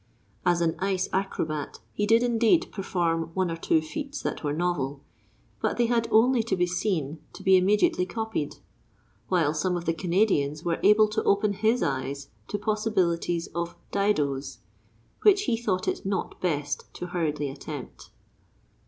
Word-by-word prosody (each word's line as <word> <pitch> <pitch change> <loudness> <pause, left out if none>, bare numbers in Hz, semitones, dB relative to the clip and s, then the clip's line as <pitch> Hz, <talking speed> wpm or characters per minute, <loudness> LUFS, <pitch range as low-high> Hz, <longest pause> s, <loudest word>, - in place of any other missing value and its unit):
As 175 -1 +3
an 165 -1 +1
ice 190 -1 0
acrobat 155 -6 -2 0.2
he 210 - -1
did 230 +2 +5
indeed 240 +7 +3
perform 170 -4 -1
one 185 -2 +1
or - - -2
two 165 -1 +2
feats 280 - -5
that - - -3
were 145 - 0
novel, 145 -4 -1 0.6
but - - 0
they 240 - +3
had 230 -1 +1
only 240 +2 +4
to 225 -3 -1
be 180 -1 +2
seen 175 -5 -2
to - - -11
be 190 0 +6
immediately 185 -1 +3
copied; 220 -9 -3 0.7
while 165 -5 +2
some 180 +3 0
of 170 - -6
the 165 - +1
Canadians 170 -4 +1
were 170 -1 -1
able 210 +2 +6
to 215 +1 -1
open 200 +1 +2
his 225 +4 +1
eyes 140 +1 -3 0.2
to - - -2
possibilities 190 -6 0
of 170 +1 -3 0.2
"didoes" 145 - 0 0.6
which 405 -1 +5
he 240 - +1
thought 205 -6 -1
it - - -1
not 195 -1 -3
best 145 -5 -2
to - - -5
hurriedly 155 -5 -1
attempt. 140 0 -8
180 Hz, 160 wpm, -27 LUFS, 155-210 Hz, 0.7 s, be